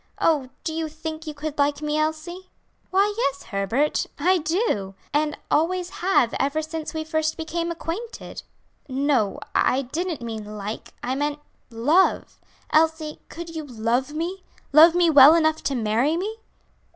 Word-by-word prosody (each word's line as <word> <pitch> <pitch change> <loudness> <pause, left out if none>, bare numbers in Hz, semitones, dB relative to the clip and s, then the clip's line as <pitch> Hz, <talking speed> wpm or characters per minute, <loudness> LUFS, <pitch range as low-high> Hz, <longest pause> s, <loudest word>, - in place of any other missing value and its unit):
Oh, 290 -6 +2
do 320 - -3
you 320 -1 -2
think 315 0 -7
you 305 - -5
could 295 0 -5
like 285 0 +2
me, 300 0 -1
Elsie?" 315 +4 -3 0.4
"Why, 400 +2 +2
yes, 280 - -1
Herbert; 220 +9 0
I 360 +5 +3
do, 305 - -1 0.2
and 300 0 +1
always 355 +3 +1
have 350 -10 +3
ever 295 +3 0
since 315 0 -5
we 315 - -2
first 315 0 -1
became 335 +1 -3
acquainted." 340 +7 -6 0.5
"No, 260 -6 +1
I 265 +2 +2
didn't 315 +1 -3
mean 215 -2 -6
like, 215 +3 -6
I 255 - -1
meant 290 +2 -1 0.3
love. 290 +11 +2 0.3
Elsie, 315 -1 +2
could 330 0 -8
you 315 - -4
love 245 +1 -1
me 340 +5 -4 0.3
love 325 +3 +8
me 345 -2 +4
well 290 +2 +9
enough 315 -1 +2
to 275 - 0
marry 235 +7 +1
me?" 425 +5 -3
310 Hz, 150 wpm, -24 LUFS, 270-330 Hz, 0.5 s, well